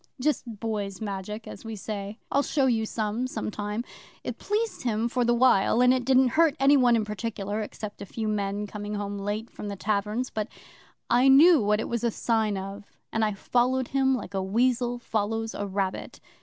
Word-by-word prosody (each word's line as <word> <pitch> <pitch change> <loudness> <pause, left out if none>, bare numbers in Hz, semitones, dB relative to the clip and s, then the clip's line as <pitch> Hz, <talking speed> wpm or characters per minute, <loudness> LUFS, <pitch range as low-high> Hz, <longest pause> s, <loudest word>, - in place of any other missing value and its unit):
'Just 250 -6 -1
boy's 205 -4 -3
Magic 210 +1 -5
as - - -9
we 225 -1 -6
say. 205 0 -5
I'll 280 - +3
show 285 -1 +1
you 225 -4 +1
some, 220 +3 -2
some 255 - -4
time. 210 +2 -3 0.4
It - - -5
pleased 435 +2 -1
him 230 -1 0
for 245 +1 0
the 240 0 +3
while, 235 -3 +4
and 250 0 +6
it 255 -1 -1
didn't 260 0 +5
hurt 315 +2 +3
any 275 +1 +6
one 250 -3 +5
in 220 -2 +1
particular 210 0 -3
except 210 0 -7
a - - -5
few 220 +2 -4
men 205 -1 -1
coming 210 0 -5
home 205 0 -4
late 210 +3 -3
from 210 - -7
the 200 - -4
taverns. 210 +5 -1
But 215 -1 -2 0.6
I 245 +3 +5
knew 295 +3 +7
what 210 0 +2
it - - -2
was 235 -1 -2
a 235 - +3
sign 220 -2 0
of, 195 +2 -6 0.3
and 220 - +1
I 215 -1 +1
followed 250 +5 +1
him 265 -1 +2
like 205 -5 -6
a 195 - 0
weasel 240 +4 +1
follows 225 -1 -2
a 205 - -3
rabbit. 195 -1 -3
220 Hz, 200 wpm, -27 LUFS, 205-250 Hz, 0.6 s, knew